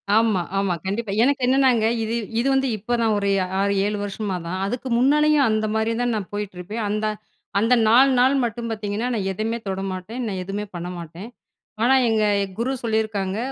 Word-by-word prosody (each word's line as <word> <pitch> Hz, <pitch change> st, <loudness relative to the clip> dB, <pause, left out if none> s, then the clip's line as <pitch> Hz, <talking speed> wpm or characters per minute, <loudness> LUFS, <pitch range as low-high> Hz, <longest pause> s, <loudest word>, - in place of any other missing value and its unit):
ஆமா, 220 Hz, -5 st, +3 dB, 0.2 s
ஆமா. 195 Hz, -2 st, +1 dB
கண்டிப்பா. 200 Hz, +2 st, -2 dB
எனக்கு 280 Hz, 0 st, +2 dB
என்னன்னாங்க, 255 Hz, -4 st, +3 dB, 0.2 s
இது 220 Hz, +1 st, -2 dB, 0.3 s
இது 260 Hz, -, +1 dB
வந்து 270 Hz, 0 st, +2 dB
இப்பதான் 230 Hz, +1 st, 0 dB
ஒரு 200 Hz, 0 st, 0 dB, 0.3 s
6-7 200 Hz, +1 st, +1 dB
வருஷமா 200 Hz, -1 st, -3 dB
தான். 185 Hz, +3 st, -3 dB
அதுக்கு 245 Hz, +5 st, -4 dB
முன்னாலேயும் 295 Hz, +2 st, +4 dB
அந்த 215 Hz, 0 st, +1 dB
மாரி 220 Hz, +1 st, +1 dB
தான் 245 Hz, -1 st, 0 dB
நான் 200 Hz, -3 st, -4 dB
போயிட்டுருப்பேன். 205 Hz, +1 st, -5 dB
அந்த 215 Hz, +1 st, -1 dB, 0.5 s
அந்த 230 Hz, +4 st, +3 dB
4 255 Hz, +5 st, +6 dB
நாள் 260 Hz, +2 st, +4 dB
மட்டும் 230 Hz, 0 st, -3 dB
பாத்தீங்கன்னா, 210 Hz, +2 st, -3 dB
நான் 195 Hz, -4 st, -1 dB
எதுமே 220 Hz, +4 st, -2 dB
தொட 190 Hz, 0 st, -2 dB
மாட்டேன். 185 Hz, +7 st, -6 dB
நான் 190 Hz, -3 st, -3 dB
எதுமே 200 Hz, +3 st, -4 dB
பண்ண 175 Hz, +1 st, -5 dB
மாட்டேன். 170 Hz, +6 st, -9 dB, 0.5 s
ஆனா 265 Hz, +2 st, +5 dB
எங்க 220 Hz, -1 st, +2 dB, 0.3 s
குரு 245 Hz, +3 st, -1 dB
சொல்லியிருக்காங்க. 215 Hz, -3 st, -1 dB
220 Hz, 170 wpm, -22 LUFS, 200-240 Hz, 0.5 s, 4